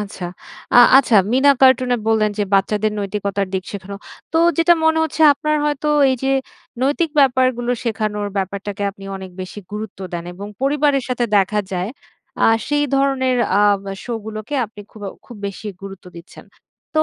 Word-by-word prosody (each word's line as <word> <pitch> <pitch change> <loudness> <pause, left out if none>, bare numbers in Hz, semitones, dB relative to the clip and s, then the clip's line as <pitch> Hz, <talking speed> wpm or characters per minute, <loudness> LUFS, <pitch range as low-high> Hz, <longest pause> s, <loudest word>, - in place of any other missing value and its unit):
আচ্ছা। 195 -3 -6 0.5
আ - - +7 0.2
আচ্ছা, 245 -5 +4 0.2
'মিনা 265 +3 +5
কার্টুন' 255 -1 +5
এ - - +1
বললেন 215 -1 +2
যে, 205 - +2
বাচ্চাদের 210 +2 +1
নৈতিকতার 200 -1 -2
দিক 185 - -1
শেখানো। 200 0 -7 0.4
তো 325 - +2 0.2
যেটা 335 +1 +5
মনে 320 0 +3
হচ্ছে, 315 +1 -2
আপনার 305 +2 -1
হয়তো 295 0 -1 0.2
এই 260 - 0
যে 270 - +1 0.5
নৈতিক 290 +4 +1
ব্যাপারগুলো 255 -2 +2
শেখানোর 215 -2 -2
ব্যাপারটাকে 200 +1 -3
আপনি 195 0 -14
অনেক 190 -1 -9
বেশি 185 +3 -7
গুরুত্ব 210 -2 -6
দেন 170 0 -4
এবং 200 +2 -8 0.2
পরিবারের 285 -1 +2
সাথে 245 -1 0
দেখা 210 +2 +2
যায়, 185 +4 -2 0.5
আ - - +6 0.2
সেই 290 0 +1
ধরনের 270 -2 +1 0.3
আম 205 -1 +3 0.2
শোগুলোকে 220 +2 -6
আপনি 210 0 -13
খুবও 205 -3 -7 0.2
খুব 240 - -11
বেশি 200 +2 -7 0.2
গুরুত্ব 195 -1 -9
দিচ্ছেন। 170 - -13 0.5
তো 310 - +4
220 Hz, 160 wpm, -19 LUFS, 200-270 Hz, 0.5 s, আ